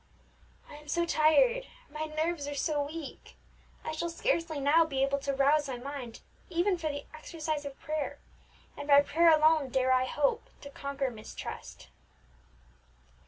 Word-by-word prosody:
I 295 - -11
am 300 0 -15
so 340 +3 +1
tired 470 +12 +3 0.2
my 310 +1 -3
nerves 310 -1 -2
are 290 - -4
so 290 0 0
weak! 310 -1 -9 0.5
I - - -2
shall 340 +2 -3
scarcely 335 -4 -1
now 290 +4 +5
be 275 -4 -1
able 275 +1 +1
to 280 0 -2
rouse 280 +2 +3
my 260 -2 -4
mind 255 -2 -7 0.3
even 360 +3 +1
for 315 -2 -2
the 285 -1 -5
exercise 310 -1 -4
of 280 -1 -8
prayer, 305 -1 -3 0.6
and 290 - -7
by 285 -1 +8
prayer 330 +4 +4
alone 310 -2 +4
dare 260 0 +1
I 255 0 +4
hope 280 +2 0
to 280 - -10
conquer 280 -2 -3
mistrust." 215 -2 -9
295 Hz, 160 wpm, -30 LUFS, 280-320 Hz, 0.6 s, by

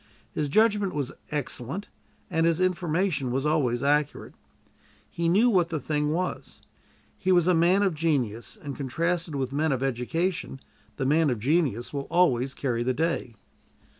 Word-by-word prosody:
His 150 -2 -2
judgment 205 0 +2
was 140 -3 -2 0.2
excellent, 145 - -4 0.4
and 165 -2 +1
his 165 0 +1
information 175 -5 0
was 135 +3 -1
always 140 -5 +1
accurate. 145 +1 0 0.7
He 170 0 -1
knew 205 +8 +4
what 180 -7 +3
the 160 -2 -2
thing 150 +1 -1
was. 180 +4 -3 0.6
He 190 -1 +1
was 175 -2 +4
a 180 - +4
man 175 +4 +4
of 195 -3 +2
genius, 135 -9 -1
and 140 -2 -6
contrasted 165 +4 -1
with 135 -1 -2
men 155 +2 +1
of 130 -1 -1
education 135 +5 -2 0.4
the 135 - -1
man 155 +2 +3
of 125 - 0
genius 130 - 0
will 140 -1 -4
always 135 -7 +2
carry 120 -4 -1
the 125 +1 0
day. 160 -7 -1
150 Hz, 160 wpm, -26 LUFS, 135-175 Hz, 0.7 s, knew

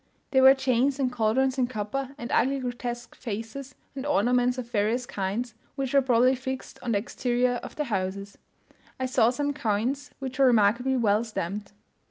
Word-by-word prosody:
There 265 -1 +4
were 265 +1 +8
chains 265 +1 +1
and 260 -2 +1
cauldrons 250 +3 +1
in 250 - +2
copper, 255 +4 -4
and 235 - -6
ugly 275 +2 +2
grotesque 245 -1 -5
faces 240 +4 -6 0.2
and 265 - -4
ornaments 250 -2 +2
of 250 -2 -5
various 225 +3 +1
kinds, 215 +3 -3 0.2
which 270 -1 -3
were 275 - +6
probably 250 0 +4
fixed 260 0 -5
on 235 - -1
the - - +3
exterior 245 +3 0
of - - -9
the 300 - -1
houses. 200 -4 -3 0.6
I 260 - 0
saw 250 -3 +3
some 285 +3 -1
coins 255 +4 -1
which 265 -1 -6
were 270 - +6
remarkably 240 +3 +3
well 215 -2 +2
stamped. 205 -2 -5
245 Hz, 175 wpm, -27 LUFS, 220-265 Hz, 0.6 s, were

